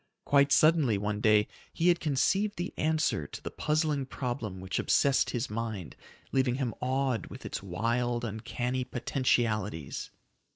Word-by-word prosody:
Quite 140 0 +4
suddenly 155 -10 +4
one 105 +1 -2
day 105 -1 +4 0.2
he 170 +2 +2
had 175 0 +4
conceived 190 +8 +1
the 175 +1 -3
answer 155 - 0
to - - -8
the - - -6
puzzling 150 -3 0
problem 120 -8 -4
which 95 -1 -3
obsessed 140 -1 +3
his 120 +1 -2
mind, 110 -5 -4 0.4
leaving 130 -2 +2
him 130 -4 -2
awed 130 -1 0
with - - -10
its - - -4
wild, 120 +5 -1
uncanny 120 +4 -3
potentialities. 115 - -1
125 Hz, 140 wpm, -30 LUFS, 110-140 Hz, 0.4 s, Quite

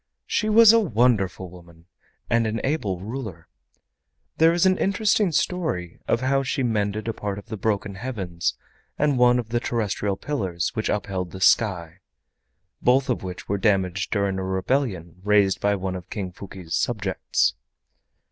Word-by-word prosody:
She 215 - 0
was 225 0 +8
a 230 - +6
wonderful 110 - +1
woman, 85 -2 -16 0.4
and 115 -1 +2
an 110 +1 -2
able 105 - -1
ruler. 105 -6 -6 0.9
There 165 +1 +5
is 175 +2 +2
an 185 0 +3
interesting 210 0 +2
story 155 - -1
of 115 - +1
how 135 +1 +2
she 135 +1 -1
mended 105 -2 -1
a 115 - -1
part 100 -2 -4
of 100 - -9
the - - -4
broken 100 -1 -1
heavens 95 -6 -3 0.4
and 145 -3 +1
one 125 0 +5
of 120 -3 -3
the 120 +1 0
terrestrial 105 -4 -2
pillars 95 - -2
which 110 - -2
upheld 95 -3 -2
the 95 - -9
sky, 90 -3 +2 0.8
both 130 +1 +3
of 120 - -2
which 90 -1 -7
were 100 0 -1
damaged 95 -2 +1
during 100 -2 0
a - - -3
rebellion 95 - -1
raised 100 -2 +3
by 100 0 +2
one 95 -1 -3
of 90 -2 -8
King 95 -4 -4
Fuki's 90 -2 -9
subjects. 100 -6 0
105 Hz, 160 wpm, -24 LUFS, 95-130 Hz, 0.9 s, was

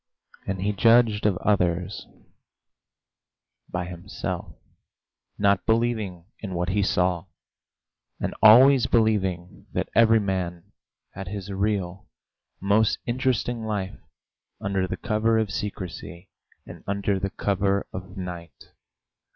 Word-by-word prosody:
And 95 -1 -2
he 105 +1 0
judged 115 0 +4
of 95 -4 +1
others 90 -1 0 1.6
by 90 0 -3
himself, 90 +2 -6 0.8
not 100 -2 +2
believing 110 -7 0
in 95 -4 -6
what 90 0 -1
he 100 +3 +1
saw, 90 -2 +1 0.9
and - - -2
always 125 +4 +8
believing 95 -6 0
that - - -2
every 115 -1 +5
man 95 -2 -3 0.4
had 95 -1 -8
his 100 0 -6
real, 100 -2 -2 0.5
most 100 +3 +2
interesting 120 -1 -1
life 105 -3 -3 0.6
under 95 -2 -1
the - - -4
cover 110 0 +1
of 110 -3 0
secrecy 95 -3 -6 0.4
and - - -11
under 100 0 0
the 100 +1 -2
cover 100 0 0
of 95 +1 -8
night. 85 -6 -8
100 Hz, 110 wpm, -25 LUFS, 90-110 Hz, 1.6 s, always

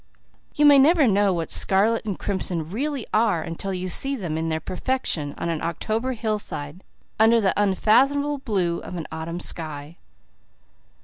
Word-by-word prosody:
You 295 - +3
may 285 -1 +8
never 310 +2 +5
know 205 -1 +3
what 170 -3 -3
scarlet 215 +4 +2
and 200 -4 -3
crimson 175 -5 -2
really 265 - -3
are 210 -7 +2
until 165 +4 -5
you 185 0 -3
see 270 +10 +1
them 175 - -4
in 165 +1 -2
their 160 0 -1
perfection 180 - -3
on 170 - -3
an 165 -2 -2
October 220 +9 -2
hillside, 205 -8 -4 0.4
under 225 +1 +5
the 195 -4 +2
unfathomable 270 +9 +2
blue 190 -9 -1
of - - -8
an 165 -3 -5
autumn 160 +2 -5
sky. 155 -2 -6
195 Hz, 160 wpm, -23 LUFS, 170-235 Hz, 0.4 s, may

